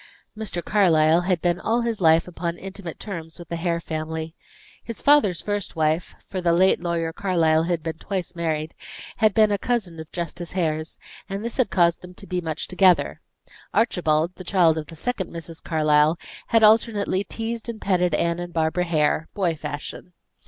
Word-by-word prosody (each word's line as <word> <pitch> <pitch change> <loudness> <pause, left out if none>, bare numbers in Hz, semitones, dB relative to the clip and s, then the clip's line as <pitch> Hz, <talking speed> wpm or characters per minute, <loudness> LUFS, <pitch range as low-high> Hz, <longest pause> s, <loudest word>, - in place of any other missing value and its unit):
Mr. 210 -5 -4
Carlyle 170 -4 +4
had 180 -3 +1
been 175 0 +1
all 230 +4 +1
his 230 -3 -2
life 160 0 +5
upon 170 -1 -4
intimate 195 -3 -7
terms 165 -6 -6
with 170 -2 -11
the 170 - -2
Hare 170 0 -1
family. 160 0 -4 0.5
His 230 - -7
father's 280 -12 +4
first 205 -3 -3
wife 160 +1 0
for 185 - -4
the 170 -1 +3
late 185 +1 +4
lawyer 170 -2 -1
Carlyle 165 -5 +2
had 170 -2 -1
been 160 0 -4
twice 185 -3 -4
married 160 -2 -2 0.4
had 215 -4 +3
been 215 -1 +5
a 200 - +1
cousin 195 -10 -2
of 160 0 -9
Justice 175 0 -5
Hare's, 155 -3 -1 0.3
and 200 +3 -4
this 235 - -4
had 255 -6 +2
caused 170 -2 +2
them 180 0 -12
to 200 - -11
be 180 -2 -2
much 160 -2 -4
together. 185 -1 +3 0.5
Archibald, 170 -6 +2
the 185 - -8
child 175 -3 +3
of 150 - -7
the 165 - -10
second 190 +1 -3
Mrs. 165 -1 -8
Carlyle, 155 0 +3 0.3
had 225 -1 +3
alternately 215 -3 +3
teased 230 +2 -5
and 225 -2 -5
petted 180 -5 +1
Anne 170 0 0
and 175 0 -6
Barbara 165 +2 +1
Hare, 155 -1 +1
boy 180 -5 +1
fashion. 150 +4 -7
175 Hz, 180 wpm, -24 LUFS, 160-195 Hz, 0.5 s, life